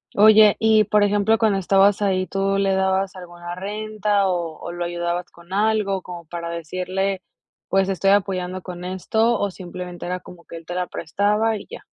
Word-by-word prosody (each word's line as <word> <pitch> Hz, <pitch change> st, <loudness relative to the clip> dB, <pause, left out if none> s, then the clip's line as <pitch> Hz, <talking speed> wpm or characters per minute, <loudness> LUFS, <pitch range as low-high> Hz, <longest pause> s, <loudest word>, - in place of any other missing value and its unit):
Oye, 215 Hz, 0 st, +7 dB
y, 220 Hz, -1 st, +4 dB
por 210 Hz, +1 st, +3 dB
ejemplo, 205 Hz, +2 st, +3 dB
cuando 215 Hz, -3 st, +2 dB
estabas 195 Hz, +2 st, +3 dB
ahí, 185 Hz, -2 st, +1 dB
¿tú 195 Hz, 0 st, 0 dB
le 195 Hz, -1 st, +2 dB
dabas 190 Hz, 0 st, 0 dB
alguna 175 Hz, -1 st, -8 dB
renta 210 Hz, +1 st, -1 dB
o 170 Hz, -3 st, -2 dB
o -, -, -7 dB
lo 175 Hz, 0 st, -4 dB
ayudabas 175 Hz, 0 st, -3 dB
con 170 Hz, +1 st, -18 dB
algo?, 205 Hz, -1 st, +1 dB
como 175 Hz, -1 st, -9 dB
para 170 Hz, +1 st, -6 dB
decirle: 185 Hz, +3 st, -3 dB, 0.5 s
"Pues, 195 Hz, 0 st, +2 dB
estoy 195 Hz, +1 st, +2 dB
apoyando 185 Hz, -2 st, 0 dB
con 180 Hz, -1 st, -8 dB
esto", 220 Hz, +5 st, +1 dB
o, 200 Hz, -1 st, -1 dB
¿simplemente 180 Hz, -1 st, -8 dB
era 180 Hz, +1 st, -3 dB
como 175 Hz, -1 st, -14 dB
que -, -, -10 dB
él 165 Hz, 0 st, -10 dB
te 175 Hz, -, -6 dB
la 180 Hz, 0 st, -1 dB
prestaba 210 Hz, +6 st, 0 dB
y -, -, -11 dB
ya? 485 Hz, -, -9 dB
190 Hz, 185 wpm, -22 LUFS, 180-205 Hz, 0.5 s, Oye